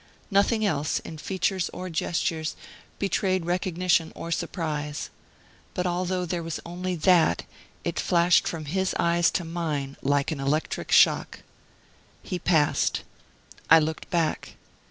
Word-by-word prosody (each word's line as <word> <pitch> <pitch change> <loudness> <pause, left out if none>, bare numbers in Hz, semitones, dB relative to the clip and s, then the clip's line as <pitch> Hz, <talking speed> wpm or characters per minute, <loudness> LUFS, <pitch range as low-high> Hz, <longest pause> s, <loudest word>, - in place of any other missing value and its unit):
Nothing 215 +3 +3
else, 150 -6 0
in 160 - -9
features 190 +1 -1
or 185 - -5
gestures, 160 -1 -1 0.4
betrayed 185 -2 0
recognition 175 -1 +1
or 170 - -6
surprise. 150 -4 -3 0.6
But 180 - -1
although 180 +1 -1
there 175 0 -2
was 165 -1 -4
only 180 +1 -3
that, 170 0 +3 0.4
it - - -2
flashed 175 0 +3
from 160 -2 -4
his 190 +5 -1
eyes 170 0 +3
to 175 - -2
mine 155 -5 -3
like 140 +2 +1
an 155 - -3
electric 145 +3 -1
shock. - - +4 0.8
He 180 - -4
passed. 160 -4 +2 0.7
I 165 - +9
looked 160 0 -1
back. 170 -4 -1
170 Hz, 130 wpm, -26 LUFS, 155-180 Hz, 0.8 s, I